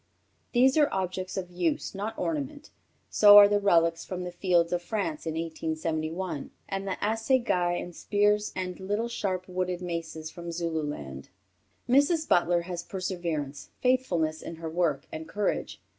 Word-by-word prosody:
These 260 +3 +4
are 295 - +4
objects 185 0 -3
of 180 -2 -4
use, 175 -3 -1
not 205 +3 -4
ornament; 295 -1 -3 0.4
so 205 -1 +9
are 205 0 +11
the 205 0 +2
relics 165 -4 +3
from 180 -1 -5
the 180 - -5
fields 175 -1 +2
of 175 - 0
France 215 - -3
in 160 - -2
1871, 160 0 -3 0.2
and 195 0 -4
the 190 - -2
assegais 220 -6 +1
and 175 -1 -7
spears 210 0 +1
and 180 -1 -4
little 205 +5 -1
sharp 185 -5 -2
wooden 180 -1 -2
maces 160 -2 -5
from 170 -1 -7
Zululand." 150 - -4 0.6
Mrs. 290 +5 +3
Butler 175 0 +3
has 175 -1 -5
perseverance, 170 -7 -4
faithfulness 175 -12 +1
in 165 - -7
her 160 0 -6
work, 160 -5 0
and 160 0 -7
courage. 210 0 -2
180 Hz, 150 wpm, -28 LUFS, 165-205 Hz, 0.6 s, are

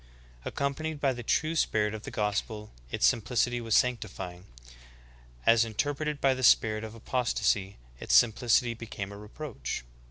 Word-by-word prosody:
Accompanied 145 +2 -3
by 135 -2 +2
the 120 - -7
true 155 +7 0
spirit 105 -8 +1
of 110 - -6
the - - -7
gospel 105 +1 -2 0.2
its - - +1
simplicity 120 - +1
was 115 -2 0
sanctifying; 95 -7 -1 1.0
as 115 0 +6
interpreted 145 +6 -2
by 135 -1 +3
the 130 - -5
spirit 110 -3 +4
of 110 0 -7
apostasy 110 -5 0 0.2
its - - +1
simplicity 120 +1 +4
became 105 -3 -7
a 100 - -9
reproach. 105 - -6
115 Hz, 140 wpm, -29 LUFS, 105-130 Hz, 1.0 s, as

